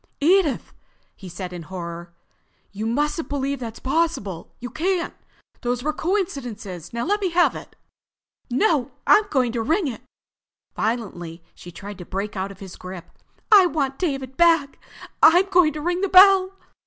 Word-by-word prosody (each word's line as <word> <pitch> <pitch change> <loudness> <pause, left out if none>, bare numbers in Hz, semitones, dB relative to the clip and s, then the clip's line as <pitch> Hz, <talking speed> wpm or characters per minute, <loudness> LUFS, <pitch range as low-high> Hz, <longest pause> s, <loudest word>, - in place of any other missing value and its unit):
"Edith!" 335 -1 +2 0.4
he 190 - -11
said 180 +1 -7
in 175 - -6
horror. 170 0 -7 0.6
"You 215 +2 -4
mustn't 295 +7 -1
believe 280 -1 -2
that's 230 -3 -6
possible. 265 - -2
You 245 0 -7
can't. 345 +2 -1 0.5
Those 245 0 -2
were 305 +1 0
coincidences. 250 - -3
Now 235 0 -3
let 415 +3 0
me 380 - +1
have 345 +1 +3
it." - - -10 0.7
"No! 265 - +1
I'm 425 - +5
going 255 -4 +1
to 235 -1 -2
ring 325 - +1
it." 245 - -6 0.7
Violently 180 -7 -3
she 175 - -12
tried 200 +2 -9
to 180 - -8
break 195 +4 -4
out 190 0 -3
of 195 - -14
his 190 -2 -9
grip. 185 -2 -9 0.4
"I 395 -4 +8
want 275 -5 -2
David 270 -6 -3
back! 330 -5 +3 0.4
I'm 355 +4 +7
going 355 -4 +5
to 305 - -6
ring 350 +3 -1
the 395 - 0
bell!" 380 0 +7
270 Hz, 160 wpm, -23 LUFS, -, 0.7 s, I